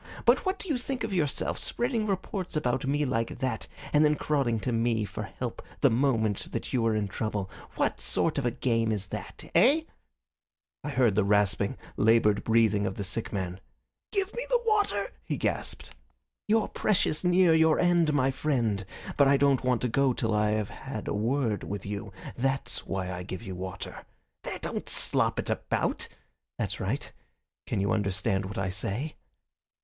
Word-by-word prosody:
But - - +4
what 380 +1 +1
do 385 - -5
you 290 -7 0
think 250 0 -3
of 220 -3 -2
yourself 155 -6 0
spreading 235 -3 0
reports 190 -2 -3
about 130 -2 0
me 145 +2 +1
like 115 -3 -1
that, 125 -4 -2 0.3
and 150 +1 +6
then 150 0 +4
crawling 135 -7 0
to 125 - -1
me 115 -2 +1
for - - -6 0.2
help - - -4 0.2
the - - +5
moment 115 -5 0
you 125 -3 +2
are 110 - +2
in 105 -1 0
trouble? 100 -1 -3 0.2
What - - 0
sort 65 - +1
of 135 - -2
a - - +4
game 115 -2 0
is 100 -2 -2
that - - -7
eh?" 260 - +5 1.0
I 150 - -3
heard 130 -6 +3
the 105 - +3
rasping, 100 0 +2 0.2
laboured 105 -2 +4
breathing 110 -3 +3
of 95 - -3
the 100 - -3
sick 105 +4 -2
man. 95 -2 -3 0.5
"Give 395 -1 -1
me 485 - -3
the - - +4
water!" 430 +2 +1
he - - -2
gasped. - - -2 0.6
"You're 220 0 +3
precious 185 -6 +1
near 180 -1 +5
your 160 -1 +5
end, 175 -3 +3
my 135 -2 +2
friend, 120 -8 0 0.3
but 140 - +6
I 140 0 +5
don't 140 -2 +3
want 125 -2 +1
you 125 - +1
to - - -7
go 135 0 +3
till 115 -2 -1
I 105 0 +2
have 105 -1 -1
had 135 -6 -6
a - - -1
word 115 +1 0
with 100 0 -5
you. 105 +1 -5 0.2
That's 135 +2 -1
why 95 -1 -2
I 90 0 -4
give 90 0 -6
you 95 - -6
water. 95 +1 -6 0.4
There, - - -5
don't - - -4
slop - - +2
it - - -1
about! - - -1 0.5
That's - - -2
right. - - -2 0.6
Can - - -1
you 100 +1 +1
understand 95 -1 0
what 105 +4 -6
I 95 -1 0
say?" 105 +10 -3
120 Hz, 185 wpm, -28 LUFS, 105-150 Hz, 1.0 s, and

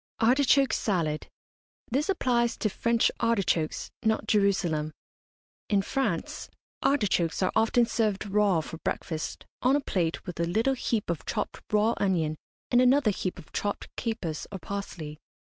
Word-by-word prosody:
ARTICHOKE 270 +3 +4
SALAD. 165 -7 0 0.6
This 280 - 0
applies 240 -10 +1
to 215 - 0
French 230 +2 +2
artichokes, 195 -8 0
not 220 0 +1
Jerusalem. 180 -7 +1 0.8
In 200 -2 +3
France, 270 +5 -2 0.3
artichokes 195 - +1
are 185 - +2
often 225 +2 +4
served 215 -3 0
raw 200 -4 +2
for 160 +1 -8
breakfast, 160 -2 -3 0.2
on 255 +3 +4
a - - +3
plate, 175 - -1
with 180 -3 -7
a 170 - +2
little 225 +10 +1
heap 230 -7 -1
of 170 - -4
chopped - - -3
raw 215 +2 +3
onion 165 -6 +1 0.4
and 245 0 +5
another 255 -2 +4
heap 185 -2 -3
of - - -13
chopped 205 0 -3
capers 195 -9 -3
or 195 - -4
parsley. 170 -5 -6
205 Hz, 145 wpm, -28 LUFS, 170-235 Hz, 0.8 s, and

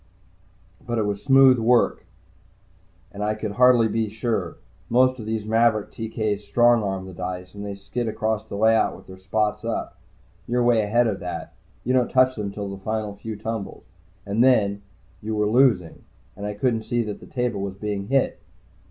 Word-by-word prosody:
"But 120 -2 -3
it 110 - +1
was 100 -1 -3
smooth 135 -2 +6
work, 120 +1 +2 1.0
and 105 +1 -5
I 105 +1 0
could 110 -1 -4
hardly 125 0 +5
be 110 0 -1
sure. 110 -5 -2 0.3
Most 130 +2 +3
of 110 - -7
these 110 -1 -2
maverick 110 -1 +2
TK's 110 -2 -3
strong 120 +3 +4
arm 95 -2 -3
the 95 - -9
dice, 90 +1 -6
and 100 0 -8
they 100 -1 -5
skid 105 +5 -4
across 110 0 -1
the - - -8
layout 110 +2 +3
with - - -15
their 95 0 -12
spots 105 +2 -1
up. 115 -1 -4 0.5
You're 120 +1 +1
way 120 -2 +4
ahead 120 +4 +2
of 105 -4 -1
that 85 -2 -6 0.3
you 125 - 0
don't 125 -2 +2
touch 130 0 +3
them 105 -2 -4
till 100 0 -5
the 100 0 -7
final 110 -1 -3
few 110 +2 -6
tumbles. 110 -1 -5 0.4
And 105 +4 +1
then, 100 -6 +3 0.4
you 110 +1 -3
were 105 0 +1
losing, 110 -7 +2 0.3
and 100 +2 -5
I 105 - -4
couldn't 115 +1 0
see 120 +1 -1
that 105 -2 -6
the - - -13
table 125 -5 -2
was 100 -1 -4
being 100 -1 -4
hit." 135 -7 +1
110 Hz, 185 wpm, -23 LUFS, 100-120 Hz, 1.0 s, smooth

